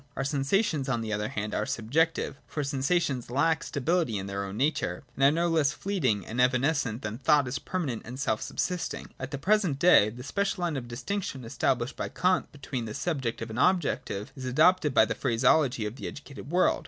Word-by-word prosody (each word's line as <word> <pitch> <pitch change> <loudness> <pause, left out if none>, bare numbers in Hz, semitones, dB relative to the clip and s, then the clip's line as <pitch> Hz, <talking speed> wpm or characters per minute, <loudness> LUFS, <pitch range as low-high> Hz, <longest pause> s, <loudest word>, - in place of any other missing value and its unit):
Our 135 - -2
sensations 145 +2 0
on 120 -3 0
the 110 -1 -3
other 105 0 -1
hand 105 0 -4
are - - -1
subjective; 135 +5 0
for 150 - -3
sensations 140 -2 0
lack 150 +5 +2
stability 155 - 0
in 95 - -4
their 100 0 -3
own 100 +1 -6
nature, 145 +4 0
and 135 - -1
are 140 - +8
no 170 +3 +1
less 155 -3 +2
fleeting 130 - -1
and 120 +3 -1
evanescent 130 -2 +1
than 105 +3 -4
thought 145 0 +3
is 125 - -3
permanent 155 -12 -3
and 125 +3 -8
self 110 -6 0
subsist 180 -1 -2
ing. - - -10
At 130 - -5
the 140 - -4
present 185 -2 +2
day, 150 -9 +6
the 120 +3 -9
special 200 - -1
Hne 165 -5 0
of 120 - -10
distinction 135 - -4
established 120 +2 -1
by - - -3
Kant 185 +1 +1
between 135 -4 -5
the 110 - -6
subjective 130 -7 -2
and 110 - -4
objective 145 - +1
is 130 -2 -7
adopted 155 +3 +3
by - - +7
the 110 - -2
phraseology 125 0 +2
of 105 +4 -5
the - - -5
educated 140 -1 -9
world. 180 +3 +3
135 Hz, 205 wpm, -28 LUFS, 120-160 Hz, -, are